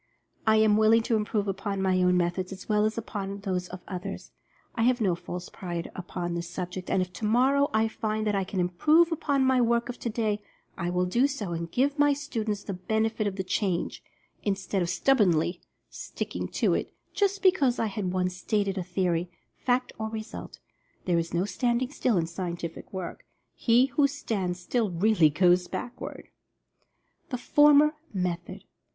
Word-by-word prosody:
I 220 - +6
am 215 -1 +5
willing 220 +1 +5
to 230 - +1
improve 210 -1 0
upon 195 +1 -2
my 185 -1 +2
own 180 0 +4
methods 180 +1 -1
as 190 0 -9
well 210 -1 +3
as 215 +1 -1
upon 200 -3 -4
those 185 -3 -2
of 180 0 -9
others 180 -2 -6 0.2
— - - -36
I 230 - -1
have 245 +2 +3
no 195 -5 +2
false 175 +1 -6
pride 175 -2 -5
upon 175 -1 -4
this 170 0 -4
subject, 180 0 -5
and 185 - +2
if 180 0 -9
tomorrow 260 +6 +2
I 220 +1 +2
find 215 0 -2
that 210 - +1
I 195 -1 +1
can 190 0 -4
improve 300 - +4
upon 285 -4 +1
my 260 -1 +4
work 235 +1 +1
of 245 - -6
today, 215 -3 -1 0.3
I 170 - -2
will 180 +1 +1
do 240 +9 +3
so 230 -10 -4
and 170 0 -3
give 280 +3 +1
my 290 0 +5
students 225 -8 -3
the 200 - -4
benefit 220 +3 0
of 195 - -3
the 190 - -2
change, 185 -2 -1 0.4
instead 195 -1 -1
of 170 - -1
stubbornly 180 - +2 0.3
"sticking - - -5
to - - +1
it," - - -2 0.2
just 400 -1 0
because 290 -10 +4
I - - +1
had 200 -3 -2
once 180 0 -1
stated 200 +1 -1
a - - -2
theory, 175 -1 -1 0.3
fact, 250 0 0
or 220 0 -2
result. 220 0 -7 0.5
There 175 -2 +2
is 165 0 -3
no 175 +2 +1
standing 240 +6 0
still 245 -7 +1
in 165 - +1
scientific 170 -1 -5
work 185 -3 -6 0.2
— - - -49
he 240 +2 +4
who 280 +2 +2
stands 200 -10 -3
still 220 +4 0
really 180 -2 +4
goes 180 +3 +3
backward. 245 - -6 1.0
THE 255 - -2
FORMER 295 +3 +5 0.2
METHOD. 180 -3 -3
205 Hz, 180 wpm, -27 LUFS, 180-235 Hz, 1.0 s, I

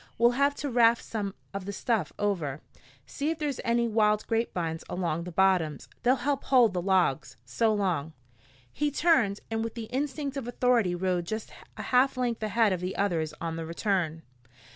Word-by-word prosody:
We'll 235 +1 +5
have 280 +3 +2
to 285 - -4
raft 235 -1 +4
some 205 -3 -4 0.2
of 200 -1 -5
the 200 - -4
stuff 205 -4 -1
over. 170 -9 -1 0.5
See 285 +2 -3
if 325 - -1
there's 295 -4 -2
any 235 0 +2
wild 210 -1 +2
grapevines 175 -8 -2
along 170 -2 -2
the 180 - -6
bottoms. 175 -5 +2
They'll 250 +2 +4
help 275 +2 -2
hold 245 -6 +5
the 180 - -1
logs. 185 -7 +1
So 220 - +1
long." 180 -7 -1 0.6
He 295 0 0
turned, 275 - +2
and 225 0 -1
with 230 -1 -5
the 230 -2 -5
instinct 280 +1 -2
of 255 -4 -4
authority 245 -6 +2
rode 180 -1 -1
just 220 +4 -5 0.3
a - - -5
half 255 +1 +3
length 240 -3 -1
ahead 215 -1 +2
of 180 - -2
the 180 +1 -3
others 165 -6 0
on 165 -1 -3
the 165 - -4
return. 170 -3 -1
210 Hz, 185 wpm, -28 LUFS, 180-245 Hz, 0.6 s, We'll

